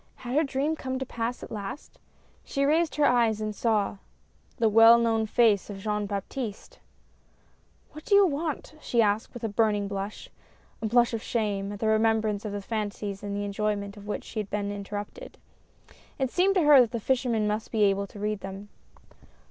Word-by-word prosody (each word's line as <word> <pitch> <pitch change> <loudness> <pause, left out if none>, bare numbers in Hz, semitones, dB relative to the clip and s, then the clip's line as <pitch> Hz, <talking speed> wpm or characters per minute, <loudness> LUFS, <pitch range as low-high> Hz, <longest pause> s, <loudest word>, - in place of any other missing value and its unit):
Had 245 +2 -3
her 310 - +4
dream 280 +2 -1
come 260 -3 -4
to 265 - -3
pass, 235 0 -4
at - - -9
last? 210 +6 -7 0.4
She 275 -1 -1
raised 315 +3 +2
her 300 - +3
eyes 230 -4 +3
and 215 0 -3
saw 210 -2 0 0.6
the 225 - +3
well 225 +2 +8
known 225 -1 +1
face 215 -3 +3
of 200 - -6
Jean 210 +1 -2
Baptiste! 210 - -5 1.1
"What 305 - -11
do 405 - +3
you 400 0 +7
want?" 310 -2 -3
she 235 -5 +2
asked 210 +1 0
with 240 - -10
a - - +1
burning 205 -1 +1
blush 200 +1 -5 0.3
— - - -33
a 220 - -1
blush 240 +1 +3
of 225 - -2
shame, 205 -4 -2
at - - -6
the 220 - -1
remembrance 220 -1 +1
of 210 - -3
the 205 0 -5
fancies 205 -2 -4
in 200 -1 -4
the 205 0 -2
enjoyment 200 0 -2
of 205 0 -12
which 210 - -3
she 220 - -6
had 205 -2 -4
been 205 0 -2
inter 205 0 -6
rupted! 205 - -7 0.8
It 265 -2 -1
seemed 385 +2 +2
to 365 - +3
her 295 -3 +8
that 235 -2 0
the 235 - -1
fisherman 240 -2 0
must 210 +1 -3
be 220 -2 +2
able 200 0 +2
to 205 - -14
read 210 0 -2
them. 195 +1 -8
220 Hz, 200 wpm, -27 LUFS, 205-245 Hz, 1.1 s, well